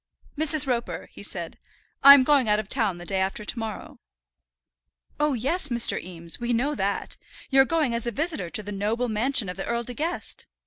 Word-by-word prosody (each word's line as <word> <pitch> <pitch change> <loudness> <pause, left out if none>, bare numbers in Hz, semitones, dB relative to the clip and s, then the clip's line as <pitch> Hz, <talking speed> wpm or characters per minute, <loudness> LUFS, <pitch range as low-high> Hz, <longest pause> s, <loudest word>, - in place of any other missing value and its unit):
"Mrs. 310 -1 +3
Roper," 245 -3 -3
he - - -12
said, - - -4 0.4
"I'm 280 -1 +9
going 275 -4 +3
out 210 - +3
of 215 - -5
town 215 -7 0
the 175 - -10
day 190 +1 -1
after 195 +2 -3
to 235 - -2
morrow." 220 -1 -7 1.2
"Oh, 300 -1 +1
yes, 280 +7 -1
Mr. 240 -2 +2
Eames, 170 -2 -5
we 240 0 -1
know 265 +6 0
that. 200 -6 -3 0.3
You're 270 0 +6
going 305 -5 0
as 235 0 -1
a - - -1
visitor 300 - -3
to 215 - -4
the 205 - -7
noble 215 +5 -2
mansion 230 +1 +2
of 180 +1 -6
the 195 - -4
Earl 235 0 -1
De 245 - -5
Guest." 325 +7 -4
235 Hz, 195 wpm, -25 LUFS, 210-280 Hz, 1.2 s, I'm